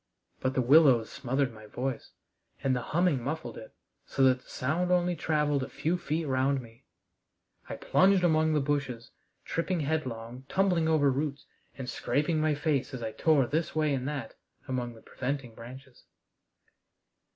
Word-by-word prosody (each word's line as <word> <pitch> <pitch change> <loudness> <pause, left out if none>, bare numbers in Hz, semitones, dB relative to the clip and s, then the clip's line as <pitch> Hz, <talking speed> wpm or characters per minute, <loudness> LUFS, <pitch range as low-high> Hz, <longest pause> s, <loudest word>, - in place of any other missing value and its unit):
But 130 0 -1
the 130 - +2
willows 130 -4 +5
smothered 135 -1 -1
my 110 -1 -13
voice, 125 +2 -4 0.5
and 130 -1 +2
the 125 - -1
humming 160 0 +1
muffled 145 -3 -4
it, 110 - -11 0.3
so 135 - 0
that 130 -1 +4
the - - -22
sound 160 +8 -1
only 180 0 +2
traveled 150 -3 +1
a 130 - -4
few 155 +5 -1
feet 165 -2 -2
round 135 0 +1
me. 115 -2 -14 0.8
I - - -4
plunged 190 0 +3
among 160 -2 +3
the 150 - +2
bushes, 135 -4 -2 0.3
tripping 170 +1 -1
headlong, 130 -5 -3
tumbling 185 -4 +2
over 150 -3 +3
roots, 140 +1 -3 0.3
and 130 -2 -6
scraping 155 +5 0
my 155 -1 +2
face 145 -3 -1
as 120 - -6
I 110 - -3
tore 150 +1 +3
this 155 +7 -2
way 155 -2 +2
and 130 -1 -2
that 140 -6 -4 0.3
among 125 -2 -3
the 110 - -16
preventing 130 -2 -4
branches. 130 +3 -12
140 Hz, 160 wpm, -29 LUFS, 125-155 Hz, 0.8 s, willows